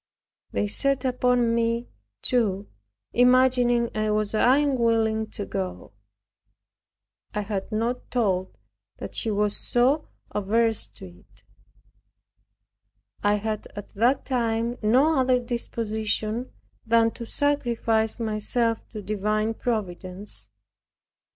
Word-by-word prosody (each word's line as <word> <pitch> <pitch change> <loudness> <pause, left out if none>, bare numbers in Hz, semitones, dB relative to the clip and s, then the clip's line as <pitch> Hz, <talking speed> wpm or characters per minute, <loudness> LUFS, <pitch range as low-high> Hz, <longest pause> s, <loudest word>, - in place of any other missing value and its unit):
They 100 +1 0
set 270 - +1
upon 250 -2 +2
me, 230 +1 0 0.4
too, 210 -5 +1 0.5
imagining 245 -1 +4
I 215 0 0
was 210 0 0
unwilling 230 -4 +3
to 205 - -4
go. 90 - -5 1.4
I 210 - 0
had 200 0 -4
not 230 +3 -2
told 190 -6 0 0.4
that 100 - -7
she 225 - -1
was 210 0 +1
so 265 +6 +2 0.2
averse 220 - +1
to 100 -1 -12
it. 90 0 -17 1.8
I 205 0 +3
had 215 0 -3
at 205 -1 -8
that 240 +6 +2
time 235 -2 -1
no 265 +8 +4
other 255 -1 +4
disposition 230 -1 -2 0.3
than 230 0 +3
to 235 0 -8
sacrifice 235 -7 0
myself 225 +1 0
to 210 -2 -6
divine 215 +2 0
Providence. 185 - -3
225 Hz, 105 wpm, -25 LUFS, 210-245 Hz, 1.8 s, imagining